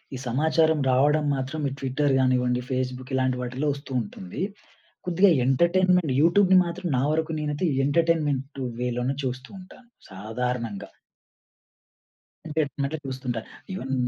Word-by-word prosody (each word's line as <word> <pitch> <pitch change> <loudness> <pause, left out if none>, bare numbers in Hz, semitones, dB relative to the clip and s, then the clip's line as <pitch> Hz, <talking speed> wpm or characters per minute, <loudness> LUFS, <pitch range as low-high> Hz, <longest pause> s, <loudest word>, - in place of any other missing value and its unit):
ఈ - - -4
సమాచారం 160 +4 +2
రావడం 150 +4 +3
మాత్రం 140 +3 -3
ఈ - - -8
ట్విట్టర్ 135 +1 +1
గానివ్వండి, 125 -1 +2
ఫేస్‌బుక్ 130 +1 -3
ఇలాంటి 130 -1 +1
వాటిల్లో 130 +4 -2
వస్తూ 140 0 -10
ఉంటుంది. 95 - -7 0.7
కొద్దిగా 180 +3 +4 0.2
ఎంటర్‌టైన్‌మెంట్ 170 +2 +3
యూట్యూబ్‌ని 185 +3 +5
మాత్రం 175 +1 -4
నా 125 - +1
వరకు 160 +1 0
నేనైతే 150 +4 -1 0.2
ఎంటర్‌టైన్‌మెంట్ 145 -3 0 0.2
వే 125 0 0
లోనే 125 +3 -1
చూస్తూ 130 +1 -4
ఉంటాను. 195 +6 -15 0.2
సాధారణంగా. 110 +2 -4 1.6
అంటే 160 0 -3
ఇంటర్నెట్‌లో 140 +2 -4
చూస్తుంటారు. 130 -3 -4 0.3
ఇవెన్ 135 -8 -4
140 Hz, 125 wpm, -25 LUFS, 125-160 Hz, 1.6 s, యూట్యూబ్‌ని